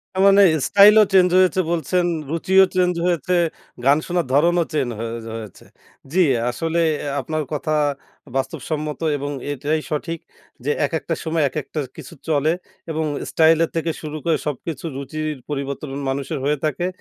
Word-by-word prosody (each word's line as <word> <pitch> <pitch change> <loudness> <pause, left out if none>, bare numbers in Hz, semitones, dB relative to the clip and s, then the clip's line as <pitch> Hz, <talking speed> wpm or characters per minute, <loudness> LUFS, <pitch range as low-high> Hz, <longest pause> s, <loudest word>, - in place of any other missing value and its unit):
তার 190 - +2
মানে 200 0 +6 0.3
স্টাইলও 210 +2 +7
চেঞ্জ 180 -1 +6
হয়েছে 185 0 +3
বলছেন, 175 +2 +1 0.3
রুচিও 190 +3 +4
চেঞ্জ 180 -1 +3
হয়েছে, 175 0 0 0.5
গান 140 +2 +6
শোনার 175 -2 0
ধরনও 170 +4 +4
চেন 140 -5 +1
হোজ 115 0 -5
হয়েছে। 110 -4 -9 0.5
জি। 185 - +1 0.3
আসলে 165 +6 -1 0.4
আপনার 155 +3 -2
কথা 155 +1 -2 0.6
বাস্তবসম্মত 150 +2 -3 0.2
এবং 145 +1 -4 0.2
এটাই 150 +3 -1
সঠিক, 165 +2 -3 0.5
যে 145 - +2
একেকটা 160 +2 -2
সময় 160 -1 0
একেকটা 155 +2 -5 0.2
কিছু - - -10 0.2
চলে 150 +1 +2 0.4
এবং 160 0 -1 0.3
স্টাইলের 165 0 +4
থেকে 165 0 0
শুরু 155 0 -5
করে, 165 -2 +2
সবকিছু 150 +3 -4
রুচির 155 +2 -4
পরিবর্তন 140 0 -4 0.2
মানুষের 135 0 -3
হয়ে 150 +1 +1
থাকে 155 +4 -1
155 Hz, 140 wpm, -21 LUFS, 145-170 Hz, 0.6 s, স্টাইলও